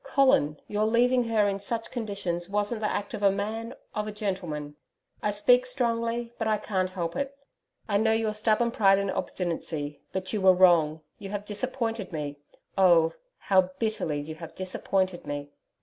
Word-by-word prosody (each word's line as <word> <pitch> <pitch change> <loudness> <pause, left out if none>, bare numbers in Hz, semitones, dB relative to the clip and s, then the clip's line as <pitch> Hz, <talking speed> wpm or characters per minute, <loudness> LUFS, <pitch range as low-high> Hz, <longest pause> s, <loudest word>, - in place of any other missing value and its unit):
Colin, 265 - +3
your 210 +1 0
leaving 245 +2 +3
her 220 -3 +2
in 200 0 -1
such 225 +3 -3
conditions 200 -7 -3
wasn't 210 +2 -1
the 210 - +1
act 205 +2 -3
of 215 - -4
a 200 - +6
MAN, 220 +5 -3 0.2
of 210 0 -2
a - - -3
gentleman. 175 -8 -4 0.5
I 210 - +1
speak 245 +5 +4
strongly, 235 -1 -1
but 225 - 0
I 215 -1 +2
can't 190 -3 -1
help 170 -2 -4
it. 280 0 -3 0.5
I 200 -2 +2
know 220 +2 +3
your 220 -1 +1
stubborn 220 +2 +2
pride 195 -4 +5
and 200 -1 0
obstinacy, 160 -4 -3
but 185 0 -4
you 210 - 0
were 190 -1 +6
wrong, 165 -4 +5 0.2
you 195 - -7
have 205 0 -4
disappointed 225 0 -3
me 145 -3 -4 0.4
oh! 170 -3 +5 0.2
how 185 -2 +3
bitterly 190 -9 -1
you 150 +2 -6
have 160 +1 -10
disappointed 185 -1 -1
me! 145 0 -5
205 Hz, 175 wpm, -27 LUFS, 180-225 Hz, 0.5 s, a